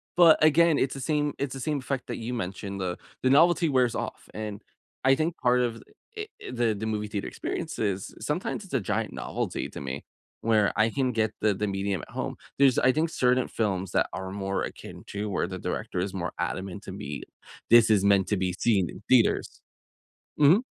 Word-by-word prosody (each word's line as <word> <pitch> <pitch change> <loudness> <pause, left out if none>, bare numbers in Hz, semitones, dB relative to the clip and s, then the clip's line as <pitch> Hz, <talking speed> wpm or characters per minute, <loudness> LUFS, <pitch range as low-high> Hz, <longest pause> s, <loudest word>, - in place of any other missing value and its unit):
But 170 -3 +7
again, 155 0 +5
it's 130 - +1
the 135 - -6
same 150 +1 0
it's 140 -2 -2
the 135 - -6
same 145 +2 -1
effect 130 0 -3
that 120 - -4
you 120 +2 -4
mentioned. 100 -2 -4
The 90 -1 -2 0.3
the 130 - +4
novelty 165 +3 +5
wears 125 -4 +2
off. - - -5
And 105 -2 -5 0.4
I 135 +1 +5
think 160 +3 -1
part 125 0 +3
of 115 -2 -1 0.4
it 430 0 -6 0.2
i 120 -3 +1
the 105 +2 -5
movie 105 -1 -2
theater 100 -1 -4
experiences, 100 -3 -3
sometimes 175 +7 -2
it's 190 - -14
a 130 - +3
giant 95 - -2
novelty - - -3
to - - -8
me, 70 +1 -5 0.4
where 110 -3 +3
I 110 +1 +4
can 130 0 0
get 110 -2 +1
the 105 -2 +3
the 105 +2 -2
medium 95 -2 -1
at - - -16
home. - - -3 0.2
There's, 135 -2 +5
I 130 0 +4
think, 160 +1 +1
certain 125 -3 +2
films 95 -4 -1
that - - +2
are 95 0 -5
more 95 -1 -2
akin - - -8
to 105 +1 -4
where 95 - 0
the 95 -1 -6
director 90 - -3
is 95 +1 -2
more 90 -3 -3
adamant 95 +1 -3
to 95 - -7
me. 70 -6 -6 0.5
"This 115 -1 +7
is 100 -2 +4
meant 100 -1 +4
to 105 - +1
be 90 -1 0
seen 100 -7 +2
in - - -10
theaters." 125 -3 +3 0.8
Mhm. 165 - +6
110 Hz, 205 wpm, -27 LUFS, 100-135 Hz, 0.8 s, But